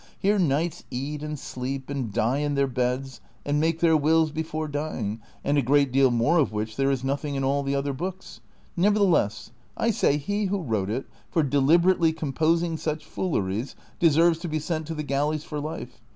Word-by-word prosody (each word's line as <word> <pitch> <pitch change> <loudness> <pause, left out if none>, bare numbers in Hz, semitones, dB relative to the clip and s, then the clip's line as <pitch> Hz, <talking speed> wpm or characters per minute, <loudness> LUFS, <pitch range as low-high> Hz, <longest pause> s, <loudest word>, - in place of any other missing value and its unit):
Here 205 +1 +2
knights 165 +1 0
eat 140 +4 -4
and 150 0 -4
sleep, 130 0 -5
and 135 -6 -3
die 115 +5 +1
in 145 -1 -1
their 140 0 +3
beds, 130 +1 -2 0.2
and 145 +1 +1
make 165 +1 0
their 165 -1 +5
wills 155 +1 +3
before 155 0 -3
dying, 140 -8 -3 0.2
and 145 0 +2
a - - +3
great 140 +1 +3
deal 135 0 +4
more 120 +8 +3
of 145 - +2
which 110 +1 -3
there 135 +2 +1
is 135 -2 0
nothing 140 +2 -2
in 135 - -1
all 140 +1 +1
the 140 0 -1
other 140 0 -1
books. 185 +6 -6 0.3
Nevertheless, 180 - +2 0.3
I 230 - +2
say 145 -8 +2
he 205 +8 -1
who 195 -1 -1
wrote 110 -7 -1
it, 125 +5 -2 0.2
for 165 - +2
deliberately 160 +5 +3
composing 160 +2 0
such 155 -1 -3
fooleries, 110 - -2 0.2
deserves 165 0 +4
to 175 - -5
be 155 -1 -1
sent 155 0 -3
to 165 - -4
the 150 - -3
galleys 150 +2 -1
for 150 - -5
life. 150 -5 -6
145 Hz, 195 wpm, -25 LUFS, 135-160 Hz, 0.3 s, their